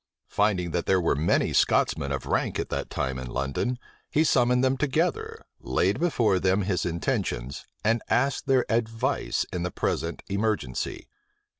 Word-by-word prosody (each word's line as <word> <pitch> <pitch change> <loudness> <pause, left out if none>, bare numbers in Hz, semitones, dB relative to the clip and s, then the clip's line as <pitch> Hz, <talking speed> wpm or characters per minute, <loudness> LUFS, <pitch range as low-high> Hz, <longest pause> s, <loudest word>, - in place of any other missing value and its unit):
Finding 95 -4 +1
that 85 - -2
there 95 -1 +4
were 85 -4 +1
many 80 +4 +1
Scotchmen - - +2
of - - -3
rank - - 0
at - - -3
that - - -3
time 65 0 -2
in 65 - -6
London, 70 - -2 0.3
he 155 - +3
summoned 125 -4 +3
them 130 0 +3
together, 180 - -1
laid - - 0
before 115 - +2
them 95 +2 +2
his 90 -2 0
intentions, 70 -6 -2 0.2
and 115 +2 +2
asked 135 +2 +1
their 130 -2 +3
advice 115 0 0
in 90 - -2
the 90 - -1
present 85 -1 -2
emergency. 100 - -2
105 Hz, 155 wpm, -26 LUFS, 85-125 Hz, 0.3 s, there